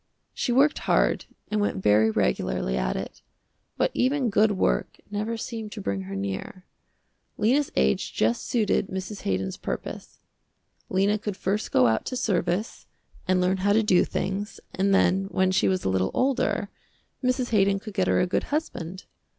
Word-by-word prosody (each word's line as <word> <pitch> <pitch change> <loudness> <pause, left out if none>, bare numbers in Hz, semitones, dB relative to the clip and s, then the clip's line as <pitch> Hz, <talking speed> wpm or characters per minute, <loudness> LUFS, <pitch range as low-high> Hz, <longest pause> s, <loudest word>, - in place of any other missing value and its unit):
She 255 - -1
worked 275 +5 +4
hard - - +2 0.3
and 210 0 +1
went 200 -2 -1
very 110 +2 +5
regularly 65 - 0
at 60 -1 -1
it, - - -6 0.6
but - - +2
even 260 -2 +1
good 210 +2 +4
work 190 - 0
never 215 +3 -2
seemed 225 -2 -5
to 220 - -7
bring 100 - -2
her 100 - -5
near. 100 - -5 0.7
Lena's 265 +7 +2
age 65 0 +1
just 115 +2 0
suited 220 -5 +1
Mrs. 190 +2 -5
Haydon's 95 0 -2
purpose. - - -6 0.7
Lena 200 +3 +2
could 205 -2 -4
first 205 +3 -2
go 125 - +5
out 110 -1 +2
to 255 - -3
service, 205 -2 -1 0.4
and 185 0 +3
learn 180 +1 +2
how 200 +2 +2
to 220 +1 +4
do 185 -4 +4
things, 195 +2 -3
and 195 +1 +1
then, 195 0 +3
when 190 -1 +1
she 185 - +2
was 185 -1 0
a - - +2
little 95 0 +1
older, 265 0 +1 0.5
Mrs. 255 -1 0
Haydon 200 -2 +3
could 210 +1 -8
get 190 -2 +1
her - - +3
a - - +3
good 180 - -1
husband. 190 - -4
195 Hz, 170 wpm, -26 LUFS, 175-220 Hz, 0.7 s, very